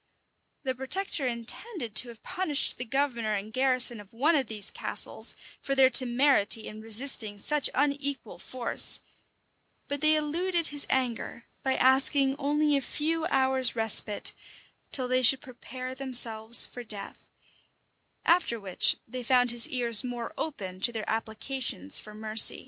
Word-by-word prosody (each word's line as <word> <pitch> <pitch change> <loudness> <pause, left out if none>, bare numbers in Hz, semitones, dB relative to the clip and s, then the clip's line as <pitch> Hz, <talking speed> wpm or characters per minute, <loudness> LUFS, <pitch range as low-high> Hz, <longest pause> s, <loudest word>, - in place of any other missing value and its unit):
The 260 -2 -3
protector 270 +2 -1
intended 240 - -5
to 250 - +5
have 230 -2 -15
punished 310 -10 -1
the 250 - -6
governor 235 -4 -3
and 210 +2 -7
garrison 255 -2 +4
of 205 -1 -16
one 285 +8 0
of 270 -5 -1
these 210 -2 -5
castles - - -1 0.3
for 275 - -4
their 265 -1 +3
temerity 240 -3 +3
in 215 0 -11
resisting 225 -1 +2
such 295 +7 0
unequal 280 -1 -3
force: 250 -2 +1 0.9
but 285 -1 -5
they 310 0 +4
eluded 335 +3 -2
his 290 -1 -1
anger 240 -2 -4 0.2
by 265 -1 -2
asking 270 +1 +2
only 295 +1 -1
a 275 - -1
few 315 +4 -3
hours' 265 -4 +2
respite, 220 -2 0 0.6
till 255 -2 0
they 255 0 0
should 255 +2 +5
prepare 255 0 -10
themselves 235 -4 +5
for 245 - -11
death; 210 -3 -6 1.0
after 325 -9 0
which 200 +1 +2
they 250 +2 -8
found 245 0 +1
his 235 -1 +2
ears 240 -2 +4
more 245 +1 -7
open 190 -12 -7
to 240 - +1
their 220 -2 -7
applications 220 - 0
for 210 0 -13
mercy. 215 0 +3
255 Hz, 145 wpm, -26 LUFS, 225-280 Hz, 1.0 s, to